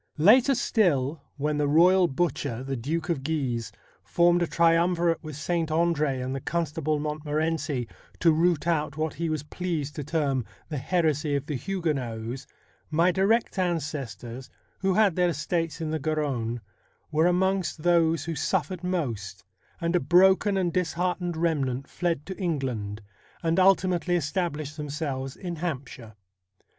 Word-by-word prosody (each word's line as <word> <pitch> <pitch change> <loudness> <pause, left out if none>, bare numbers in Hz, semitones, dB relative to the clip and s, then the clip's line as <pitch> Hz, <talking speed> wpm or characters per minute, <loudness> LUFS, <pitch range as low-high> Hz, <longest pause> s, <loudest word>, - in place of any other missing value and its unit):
Later 240 - +6
still, 160 - +1 0.2
when 150 +1 -1
the 145 - +2
royal 175 +5 +5
butcher, 135 -5 -2
the 135 0 -3
Duke 155 +8 -2
of 160 -6 0
Guise, 130 -7 -2 0.3
formed 175 - +3
a 175 - +1
triumvirate 170 +1 +2
with 155 -2 -7
Saint 165 +2 -1
Andre 155 -4 +1
and 130 +1 -3
the 135 - -2
Constable 155 -1 -1
Montmorency 150 -3 -2 0.3
to 165 - +5
root 165 0 +2
out 155 -4 0
what 155 0 -1
he 165 0 -2
was 155 -2 -2
pleased 150 -2 -3
to 150 - -3
term 140 -4 0
' - - -32
the 150 -4 -3
heresy 155 -1 +1
of 140 0 -2
the 155 - -4
Huguenots,' 135 -7 -3 0.4
my 165 +4 +3
direct 195 +3 +1
ancestors, 140 - -3 0.3
who 190 -1 +1
had 205 -5 +4
their 180 -1 +3
estates 165 +1 -2
in 155 -1 -2
the 160 - -1
Garonne, 135 -6 -1 0.5
were 160 +2 +3
amongst 185 -2 0
those 165 -2 +3
who 170 - -2
suffered 180 +2 -1
most, 115 - -3 0.4
and 170 0 0
a - - +4
broken 190 +5 +4
and 175 -3 0
disheartened 180 0 -1
remnant 140 -5 0
fled 170 -5 -2
to 190 - -6
England, 125 - -2 0.4
and 165 +2 +2
ultimately 185 -2 +3
established 155 -2 -2
themselves 140 -3 -4
in 175 -2 -5
Hampshire. 130 - -5
160 Hz, 150 wpm, -26 LUFS, 140-175 Hz, 0.5 s, Later